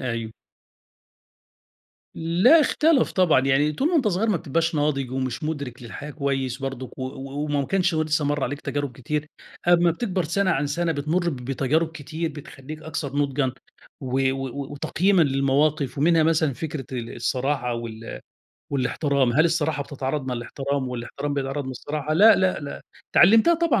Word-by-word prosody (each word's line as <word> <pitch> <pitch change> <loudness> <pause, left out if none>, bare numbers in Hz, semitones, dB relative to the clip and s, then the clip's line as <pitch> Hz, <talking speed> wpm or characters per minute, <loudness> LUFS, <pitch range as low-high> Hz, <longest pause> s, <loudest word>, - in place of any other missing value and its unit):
أيوه. 115 -3 -3 1.8
لأ 180 - +5
اختلف 305 -2 +3
طبعًا. 180 -8 +4
يعني 135 +3 +2
طول 270 - 0
ما 350 - -1
أنت 260 -8 +3
صغير 205 +4 0
ما 210 - +3
بتبقاش 165 +2 -1
ناضج، 145 -3 0
ومش 130 -2 -3
مُدرِك 140 -6 -4
للحياة 145 +5 -8
كويس 135 -4 -2
برضك 130 -2 -6
و - - -4
و 135 +2 -5
وما 145 -2 -1
كانش 185 -2 +1
ه 155 - +2
لسّه 155 -1 0
مَر 145 0 0
عليك 145 0 -4
تجارب 145 -2 -3
كتير. 150 +5 -3 0.4
أما 175 0 +5
بتكبر 185 -1 -2
سَنة 185 +4 +1
عن 145 -2 +1
سَنة 165 +3 0
بتمُر 160 +4 0
بتجارب 135 +4 0
كتير 160 +2 -4
بتخلّيك 150 +1 -10
أكثر 150 -3 -4
نُضجًا 140 -2 0 0.5
و 130 0 +1
و 135 +1 -5
وتقييمًا 180 +6 +2
للمواقف. 140 0 +1
ومنها 165 +2 +4
مثلًا 155 -2 +2
فكرة 150 -1 -5
ال 120 -3 -5
الصراحة، 125 0 -1
وال 115 -1 -7 0.5
والاحترام. 140 -1 +1
هل 155 +6 +4
الصراحة 160 -3 0
بتتعارض 140 0 -4
مع 125 - -2
الاحترام 135 +3 -3
والاحترام 125 +4 -4
بيتعارض 140 +1 -2
مع 130 - -5
الصراحة؟ 150 +4 -4
لأ، 215 +7 +7
لأ، 185 -2 +1
لأ. 140 -1 -7 0.3
اتعلِّمتها 225 - +6
طبعًا 330 -7 +2
145 Hz, 160 wpm, -24 LUFS, 135-165 Hz, 1.8 s, لأ